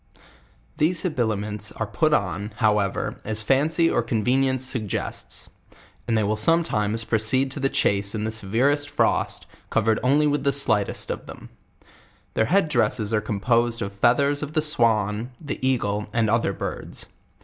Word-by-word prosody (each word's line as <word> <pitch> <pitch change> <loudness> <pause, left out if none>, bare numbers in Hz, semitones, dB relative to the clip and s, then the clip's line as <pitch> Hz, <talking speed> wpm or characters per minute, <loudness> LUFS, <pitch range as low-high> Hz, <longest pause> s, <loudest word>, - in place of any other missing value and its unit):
These 165 +3 +2
habiliments 110 - -2
are - - -3
put - - 0
on, 105 +3 -1
however, 105 -4 0
as 110 0 -2
fincy 155 +8 +2
or 120 - +2
convenience 130 +3 +1
suggests; 110 -7 -4 0.6
and 115 - +1
they 110 - +2
will 105 +1 0
sometimes 110 -5 +1
proceed 115 +5 0
to 140 - -3
the 135 0 +1
chase 100 -2 0
in 105 - -2
the 110 - -2
severest 125 +8 +1
frost, - - 0 0.2
covered 110 +1 +1
only 145 +4 +3
with 145 -2 +1
the 140 -1 +2
slightest 110 -8 +1
of - - -6
them, - - -11 0.8
Their 110 - +2
head 185 - +2
dresses 115 -5 +1
are 105 - +2
composed 115 +3 +1
of 100 0 -5
feathers 140 +8 +2
of 150 0 -5
the 155 -2 +2
swan, 115 -4 +1
the 150 -4 -5
eagle, 105 -6 0
and 115 -2 +1
other 115 +1 +2
birds. - - -6
115 Hz, 155 wpm, -24 LUFS, 105-140 Hz, 0.8 s, only